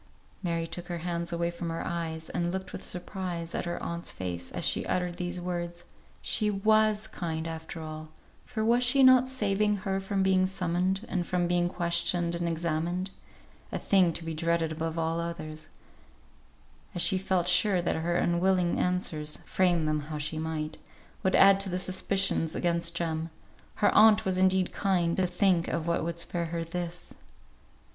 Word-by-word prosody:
Mary 170 -3 -1
took 175 +1 -7
her 175 -2 -3
hands 170 -1 -1
away 170 0 -1
from 170 0 -5
her 165 - -4
eyes, 165 -2 -3
and 175 0 -1
looked 190 +1 -5
with - - -6
surprise 175 -2 -4
at - - -2
her 175 - -3
aunt's 170 0 -3
face, 90 -1 -5
as - - -3
she - - +2
uttered 180 -1 -1
these 180 0 -3
words. 175 -1 -4 0.4
She 215 -1 +1
was 215 +1 +3
kind 165 -5 -4
after 160 0 -6
all, 155 0 -7 0.3
for 220 -2 -3
was 240 +2 +3
she 265 +2 +5
not 255 -1 +7
saving 210 -4 +1
her 195 -1 0
from 195 0 -1
being 185 -1 +3
summoned, 185 +2 -1
and 175 -3 -2
from 180 -1 0
being 175 0 +1
questioned 170 0 +1
and 170 0 -1
examined; 170 +3 -2 0.6
a - - -2
thing 185 -4 +3
to 165 - -4
be 165 0 -4
dreaded 165 0 0
above 160 +1 -3
all 165 0 0
others: 155 -2 -6 1.3
as 175 - 0
she 190 - +2
felt 185 -2 0
sure 180 +1 +3
that 175 - 0
her 170 +2 -1
unwilling 175 +1 +2
answers, 160 -4 0
frame 175 -4 +2
them 155 0 +1
how 155 - -3
she 155 +1 -3
might, 155 -1 -4 0.4
would 190 - +2
add 195 0 +7
to 195 -1 0
the 180 - -1
suspicions 185 -2 +1
against 170 -1 0
Jem; 165 -1 -2 0.5
her 205 - +3
aunt 215 0 +6
was 185 -1 0
indeed 190 -1 +2
kind, 180 -4 +1
to 185 -1 +2
think 180 -1 +2
of 165 -1 -2
what 170 0 0
would 170 0 -3
spare 170 0 -2
her 165 0 -3
this. 175 +1 -5
175 Hz, 175 wpm, -29 LUFS, 165-190 Hz, 1.3 s, not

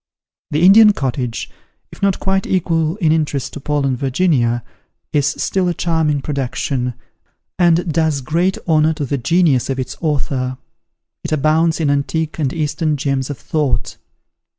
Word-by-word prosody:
The 150 +3 0
"Indian 210 +2 +8
Cottage," 125 - -3 0.4
if - - -14
not 200 -2 +1
quite 190 0 0
equal 165 -3 0
in 170 -7 +1
interest 150 -4 -1
to - - -6
"Paul 145 0 -1
and 135 -2 +1
Virginia," 125 -3 +1 0.5
is 145 -1 +2
still 180 +5 -1
a 175 - -1
charming 155 -4 0
production, 130 -3 -2 0.6
and 170 -1 +3
does 160 -3 +1
great 170 +8 0
honour 155 -1 +3
to 150 -2 -3
the 140 +1 -2
genius 145 -1 +2
of 135 - -1
its 130 - -4
author. 135 -5 -1 0.7
It - - -5
abounds 155 +2 +2
in 150 -3 +1
antique 155 +3 -1
and 140 -4 0
Eastern 155 0 -1
gems 135 -1 -1
of 145 - -5
thought. 150 +1 -2
150 Hz, 150 wpm, -18 LUFS, 135-165 Hz, 0.7 s, Indian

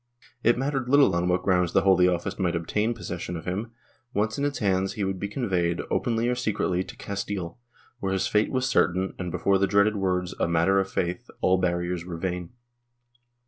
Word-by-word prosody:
It 120 +1 +3
mattered 135 -1 -1
little 140 -8 +5
on 85 +1 +1
what 90 0 +1
grounds 90 -2 +2
the - - +4
Holy 95 -2 +5
Office 90 +3 -1
might 90 -2 +1
obtain 105 +7 -1
possession 90 -3 -5
of 80 - -9
him; 100 +6 -3 0.5
once 110 +2 +1
in 140 - +1
its 145 -1 -1
hands, 95 -2 +1
he 105 - -3
would 95 -1 -2
be 100 - -2
conveyed, 95 -7 -1
openly 115 0 +1
or 125 - +2
secretly, 100 -6 0
to - - -11
Castile, 100 -2 -4 0.4
where 95 -3 -2
his 95 - 0
fate 105 0 +1
was 130 -1 0
certain 95 -5 +1
and, 90 -1 -3
before 95 +3 +1
the 100 - +3
dreaded 100 +2 +3
words 90 -2 -1
" - - -22
a - - +2
matter 85 +4 +3
of 95 0 -1
faith" 90 -1 -2
all 95 0 +3
barriers 85 -1 -1
were 85 -1 -6
vain. 90 -1 -3
95 Hz, 205 wpm, -26 LUFS, 90-105 Hz, 0.5 s, little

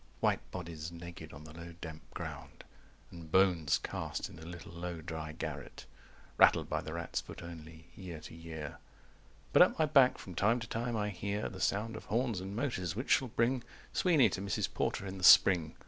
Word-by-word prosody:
White - - +1
bodies 85 -2 -6
naked 85 -2 -9
on 70 +2 -10
the 75 0 -11
low 85 +1 -9
damp 80 -2 -7
ground - - -7 0.5
And 85 -2 -10
bones 90 -5 +4
cast - - -4
in 80 - -12
a 80 - -10
little 85 0 -9
low 85 0 -5
dry 80 -1 -5
garret, - - -6 0.5
Rattled - - +6
by - - -1
the 80 - -6
rat's 85 0 -3
foot - - -10
only, 80 -1 -10
year 90 -5 -7
to - - -10
year. 80 -2 -7 0.7
But - - +7
at - - +6
my 160 - +4
back 140 -4 +5
from 95 - -9
time 110 +8 +2
to 115 - -5
time 115 +1 -2
I 105 0 0
hear 100 +2 -3
The 95 - -8
sound 110 +3 0
of - - -8
horns 115 -3 0
and 95 +2 -6
motors, 100 - -2
which 125 +5 -3
shall 130 - +4
bring 120 +2 +1 0.3
Sweeney 155 - +5
to 95 - -4
Mrs. 100 -2 -1
Porter - - -1
in 95 0 -6
the - - -8
spring. 85 -3 +7
90 Hz, 195 wpm, -33 LUFS, 80-105 Hz, 0.7 s, But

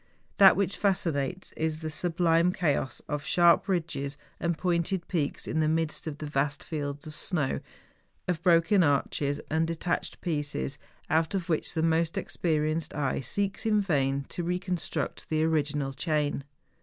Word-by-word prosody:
That 195 -1 +8
which 195 -1 0
fascinates 180 -3 0
is 160 0 -2
the 155 -1 -3
sublime 170 +1 +2
chaos 145 -7 0
of 150 -1 -3
sharp 175 +3 +4
ridges 160 -6 -2 0.2
and 170 -1 0
pointed 175 +1 0
peaks 155 -6 -1
in 160 - -1
the 155 - +3
midst 160 0 -1
of 150 -2 -4
the 155 - -6
vast 145 0 -1
fields 145 -2 -4
of 155 - -7
snow, 155 -7 -1 0.7
of 175 -3 -1
broken 175 +2 +4
arches 145 -1 +1
and 160 +1 +2
detached 165 +2 -2
pieces, 145 - -2 0.3
out 160 +4 +1
of 185 -2 -3
which 160 - 0
the 160 - +1
most 165 0 +1
experienced 155 -1 -1
eye 140 -3 0
seeks 200 +9 -2
in 215 -2 +3
vain 140 -7 +1
to - - -3
reconstruct 180 0 -3
the 155 0 +1
original 150 -3 0
chain. 145 -1 -1
160 Hz, 155 wpm, -28 LUFS, 145-175 Hz, 0.7 s, That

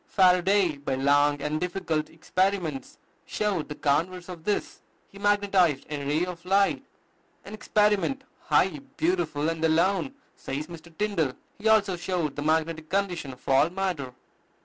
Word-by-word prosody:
Faraday, 185 -2 +3
by 140 -1 -2
long 145 +2 +3
and 155 +2 -2
difficult 175 -4 -2
experiments, 175 -3 -2 0.3
showed 200 -8 -1
the 150 - -5
converse 175 +6 0
of 170 -3 -9
this: 210 - -2 0.3
he 200 - -14
magnetized 200 -7 +2
a 145 -1 -3
ray 155 +4 +1
of 175 -2 -8
light, 195 +2 +2 0.6
an 200 - -9
experiment 210 +4 +1 0.2
"high, 190 +9 +2 0.2
beautiful, 325 - 0
and 165 0 -2
alone," 185 - +2 0.2
says 140 +3 -5
Mr. 170 0 -12
Tyndall. 185 -10 0 0.3
He 215 - -1
also 205 -4 +3
showed 175 -4 -2
the 145 - -4
magnetic 160 +1 0
condition 180 -7 -1
of 125 - -18
all 135 +4 +4
matter. 175 -9 -3
175 Hz, 145 wpm, -26 LUFS, 150-195 Hz, 0.6 s, all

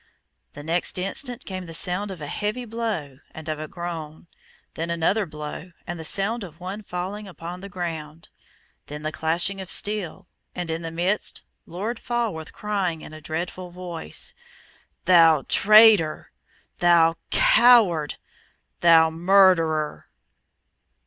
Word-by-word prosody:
The 145 - -9
next 170 +4 0
instant 235 +7 -3
came 185 -2 -6
the 165 - -4
sound 185 +4 0
of 185 -4 -8
a - - -4
heavy 210 - -3
blow 215 - -4 0.2
and 160 0 -9
of 155 -1 -3
a 155 - -5
groan, 165 -3 -7 0.5
then 165 +1 -4
another 170 +5 +1
blow 150 +3 -8
and 175 -1 -6
the - - -6
sound 205 +7 0
of 165 -4 -11
one 190 +4 -6
falling 195 +2 -5
upon 175 0 -8
the 200 - -8
ground. 165 -4 -6 0.6
Then 150 +1 -8
the 155 - -2
clashing 170 +5 0
of 190 - -9
steel, 205 -5 -2 0.3
and 175 -2 -4
in 165 +1 -3
the 165 - -5
midst 175 +5 -1 0.2
Lord 210 +7 -4
Falworth 230 -10 -3
crying, 195 -6 -2
in - - -11
a 155 - -10
dreadful 175 +4 -5
voice, 175 - -6 0.7
"Thou 165 -5 +6
traitor! 210 -7 +5 0.5
thou 170 -1 +4
coward! 235 - +5 0.6
thou 165 -1 +6
murderer!" 165 -3 +3
175 Hz, 135 wpm, -24 LUFS, 160-200 Hz, 0.7 s, Thou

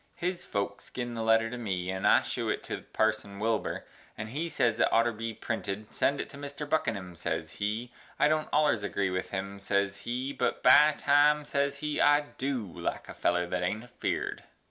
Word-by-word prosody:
His 180 0 -2
Folks 100 -1 -3
gin 120 -1 -4
the 115 - -3
letter 115 0 +3
to 125 - -5
me 95 -5 -2
and 95 0 0
I - - +6
shew - - -2
it - - -1
to - - -6
parson 110 -2 0
Wilbur 110 +2 -1 0.3
and 110 0 -5
he 155 +8 -3
ses 120 -7 +1
it - - +5
oughter 115 +1 +4
Bee 115 +1 -4
printed, 105 -2 -4
send 140 0 +1
It - - -3
to 140 - -10
mister 145 +1 -6
Buckinum, 110 - -1
ses 85 - -3
he, 110 +4 -2 0.3
i - - +5
don't 155 0 +1
ollers 145 -9 +3
agree 100 -2 0
with 90 0 -2
him, 100 +1 -4
ses 100 0 0
he, 125 +6 -3
but 130 - -1
by 150 +4 +8
Time, 150 +1 +4
ses 140 -1 0
he, 150 0 -1
I 145 0 +6 0.2
du 130 -4 -1
like 90 - -5
a - - -6
feller 90 0 +1
that 90 +1 -2
ain't 105 +5 -1
a 125 - -15
Feared. - - -3
115 Hz, 205 wpm, -29 LUFS, 100-140 Hz, 0.3 s, by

